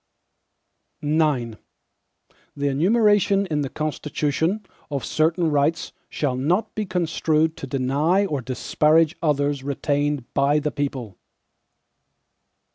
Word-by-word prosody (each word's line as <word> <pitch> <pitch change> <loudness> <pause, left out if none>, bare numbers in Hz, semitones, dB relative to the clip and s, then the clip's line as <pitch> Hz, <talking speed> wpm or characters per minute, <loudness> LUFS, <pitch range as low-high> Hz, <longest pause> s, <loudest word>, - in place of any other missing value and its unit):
IX 145 -7 +1 1.0
The 140 0 0
enumeration 200 - +3
in 150 -5 -1
the 140 - -2
Constitution, 155 +6 -2 0.2
of 140 -4 -3
certain 160 +1 +1
rights, 150 +3 +1 0.2
shall 140 -4 -1
not 170 - 0
be 215 -2 -3
construed 160 -3 0
to 135 - -6
deny 140 +9 +1
or 145 -7 -2
disparage 150 +5 +2
others 145 -2 +1
retained 145 -1 -1
by 140 +2 +3
the 150 0 -1
people. 130 -9 -4
150 Hz, 105 wpm, -23 LUFS, 140-165 Hz, 1.0 s, enumeration